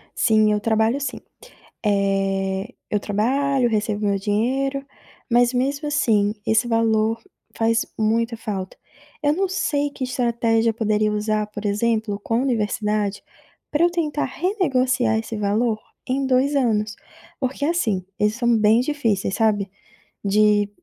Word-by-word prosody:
Sim, 215 -2 +3
eu 210 - +1
trabalho 220 +4 +1
sim. 275 -2 -4 0.7
Eh, 195 +1 0 0.2
eu 210 - +1
trabalho, 250 +5 +1
recebo 210 -1 -1
meu 200 -1 +1
dinheiro, 265 +7 -1 0.5
mas 245 +1 +4
mesmo 280 +4 -1
assim, 210 -8 +2
esse 220 +2 +2
valor 225 0 +1 0.3
faz 225 0 +1
muita 230 +2 +1
falta. 195 -4 -5 0.5
Eu 290 +1 +3
não 385 +3 0
sei 290 -6 0
que 275 - -7
estratégia 235 -2 +1
poderia 215 -1 +1
usar, 210 0 -1
por 210 0 -8
exemplo, 210 0 0
com 230 +4 -1
universidade, 210 -4 -1 0.5
pra 300 +3 +2
eu 345 - +5
tentar 305 -4 -1
renegociar 255 - +1
esse 225 0 -4
valor 215 +2 0 0.3
em 270 +1 0
2 265 +2 +2
anos, 215 -5 +1 0.4
porque 270 +1 -3
assim, 220 - 0
eles 210 +1 +2
são 240 -2 +2
bem 215 +2 +4
difíceis, 230 -9 -1
sabe, 205 -3 +1 0.5
de 205 0 +3
225 Hz, 135 wpm, -22 LUFS, 210-255 Hz, 0.7 s, eu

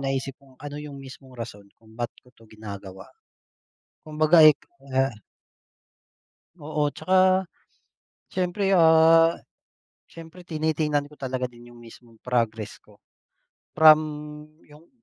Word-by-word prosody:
naisip 135 0 -3
kung 135 -2 -22
ano 145 0 -8
yung 150 -2 -9
mismong 130 -1 -13
rason 115 -4 -9
kung 110 -1 -20
ba't 120 0 -2 0.2
ko 125 - -23
'to 115 -2 -22
ginagawa. 100 -3 -10 1.0
Kumbaga, 155 +1 +4
eh, 155 - +10
k - - -27 0.3
ah 135 -1 +1 1.5
Oo, 150 0 -2
tsaka 185 +4 +2 0.9
siyempre, 185 +2 -2
ah, 165 0 +5 0.7
siyempre 165 +2 -14
tinitingnan 155 -3 -1
ko 150 - -18
talaga 130 -2 -4
din 120 0 -16
yung 120 - -16
mismong 115 -1 -17
progress 115 -4 -2
ko. - - -24 0.8
From 155 -1 +8 0.7
yung 150 +3 -19
145 Hz, 120 wpm, -24 LUFS, 120-160 Hz, 1.5 s, eh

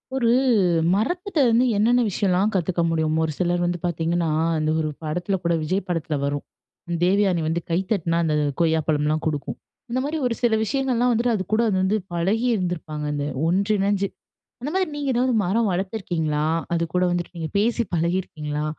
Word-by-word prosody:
ஒரு 235 -3 +2 0.7
மரத்திட்ட 350 - -1
வந்து 235 +2 +4
என்னென்ன 240 +4 +4
விஷயம்லாம் 195 +1 +1
கத்துக்க 180 -1 0
முடியும்? 160 -1 0
ஒரு 160 - -1
சிலர் 175 -1 +1
வந்து 175 0 -1
பாத்தீங்கன்னா, 170 0 0 0.3
அந்த 155 0 0
ஒரு 155 -1 -1
படத்துல 175 +5 -1
கூட 170 0 +1
விஜய் 185 +5 -1
படத்துல 165 -3 -1
வரும். 145 0 -2 0.6
தேவயானி 190 -2 +2
வந்து 165 +2 -1
கை 165 - +2
தட்டுனா, 170 -5 +1
அந்த 155 -1 +1 0.3
கொய்யாப்பழம்லாம் 155 -1 +1
குடுக்கும். 145 -2 -3 0.3
இந்த 255 - 0
மாரி 300 +3 -2
ஒரு, 235 - -1
சில 235 -2 +3
விஷயங்கள்லாம் 250 +1 +1
வந்துட்டு 235 +1 +1
அதுக்கூட 215 +4 0
அது 195 - 0
வந்து 190 +3 +2 0.2
பழகிருந்துப்பாங்க. 180 -5 -1
அந்த 145 -1 -2 0.2
ஒன்று 200 +5 +2
இணைஞ்சு. 200 0 +1 0.5
அந்தமாதிரி 350 +7 -1
நீங்க 285 -2 -1
ஏதாவது 250 +1 +2
மரம் 210 +4 +1
வளத்துருக்கீங்களா? 175 -5 -1 0.3
அதுக்கூட 170 +2 0
வந்துட்டு 175 +1 -3
நீங்க 160 -2 -4
பேசி 235 +3 +2
பழகியிருக்கீங்களா? 160 -3 -2
180 Hz, 155 wpm, -23 LUFS, 160-220 Hz, 0.7 s, வந்து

